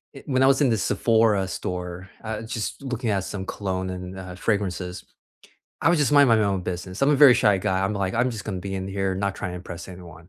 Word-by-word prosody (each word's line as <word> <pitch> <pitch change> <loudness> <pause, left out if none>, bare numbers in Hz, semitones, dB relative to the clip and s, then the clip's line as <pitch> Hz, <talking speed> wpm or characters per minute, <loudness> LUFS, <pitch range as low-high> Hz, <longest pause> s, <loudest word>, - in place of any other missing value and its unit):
eh, 135 - -9
when 130 -2 +1
I - - +6
was 135 +2 +4
in 135 - +4
the 115 - +2
Sephora 110 -2 +2
store, 90 0 -5
uh, 110 -1 -4
just 115 +2 -4
looking 125 -3 -3
at 100 -3 0
some 95 0 -5
cologne 95 -2 -3
and, 90 0 -6
uh, 90 -1 -8
fragrances, 95 -3 -2 0.8
I - - +4
was 170 -1 +3
just 145 0 +2
minding 140 -6 +6
my 110 - +2
own 100 -2 0
business, 90 +2 -5
I'm 140 - +5
a 150 - +4
very 135 -3 +8
shy 105 -5 +3
guy, 95 0 0
I'm 100 - 0
like, 95 -2 -2
"I'm 120 +2 +2
just 110 -4 -6
gonna 100 -4 -4
be 95 +1 -5
in 95 0 -3
here, 95 -1 -1
not 100 +1 -1
try - - -4
and 90 - -6
impress 90 0 -8
anyone," 85 -2 -12
100 Hz, 245 wpm, -24 LUFS, 95-115 Hz, 0.8 s, very